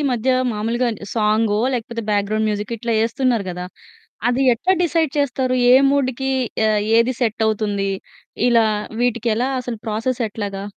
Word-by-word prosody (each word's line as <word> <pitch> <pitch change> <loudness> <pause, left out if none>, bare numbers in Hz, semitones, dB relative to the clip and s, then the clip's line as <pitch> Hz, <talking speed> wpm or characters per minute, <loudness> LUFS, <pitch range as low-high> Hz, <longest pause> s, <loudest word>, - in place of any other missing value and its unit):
మధ్య 245 +2 0 0.2
మాములుగానే 225 0 -2
సాంగో 215 -1 +2
లేకపోతే 235 -1 -4
బ్యాక్‌గ్రౌండ్ 210 +1 0
మ్యూజికో 210 +2 -3
ఇట్లా 235 +1 -2
ఎస్తున్నారు 245 -3 0
కదా! 180 0 -5 0.7
అది 260 +2 +1
ఎట్లా 360 +11 +1
డిసైడ్ 325 -3 +1
చేస్తారు 260 -2 0 0.2
ఏ - - +8 0.2
మూడ్‌కి 265 -1 0 0.4
ఆహ్, 210 -1 +2 0.2
ఏది 235 +3 +3
ఆహ్, - - -16
సెట్ 225 -1 0
అవుతుంది 205 -2 -1 0.6
ఇలా 230 -2 +4 0.4
వీటికి 235 -1 0
ఎలా 250 +4 0
అసలు 245 -2 -5
ప్రాసెస్ 230 +4 -2
ఎట్లాగా? 200 -2 -5
230 Hz, 145 wpm, -20 LUFS, 210-255 Hz, 0.7 s, ఏ